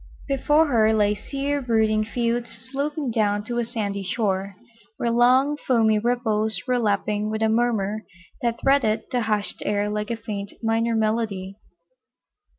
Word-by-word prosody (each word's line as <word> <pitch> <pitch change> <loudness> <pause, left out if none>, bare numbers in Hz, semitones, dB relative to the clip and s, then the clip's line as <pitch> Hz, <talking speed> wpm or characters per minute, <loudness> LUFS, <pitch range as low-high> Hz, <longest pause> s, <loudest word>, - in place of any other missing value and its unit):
Before 295 +3 +3
her 220 -6 +3
lay 210 -1 +3
sere, 280 +6 -3
brooding 220 -3 +2
fields 235 +1 -1
sloping 275 +4 -4
down 205 -2 +1
to 240 +2 -3
a - - +1
sandy 210 -4 -3
shore, 195 -1 -1 0.4
where 235 - 0
long 255 +5 +4
foamy 225 -6 +2
ripples 220 -3 0
were 250 -1 +2
lapping 210 -1 0
with 220 0 -2
a 220 - +3
murmur 220 -2 0 0.4
that 235 -1 -1
threaded 230 -6 +2
the 250 -2 +1
hushed 210 -2 -1
air 205 0 0
like 210 0 -3
a 235 - -2
faint 205 -3 -6
minor 225 +1 +1
melody. 215 -3 -1
225 Hz, 150 wpm, -24 LUFS, 210-240 Hz, 0.4 s, long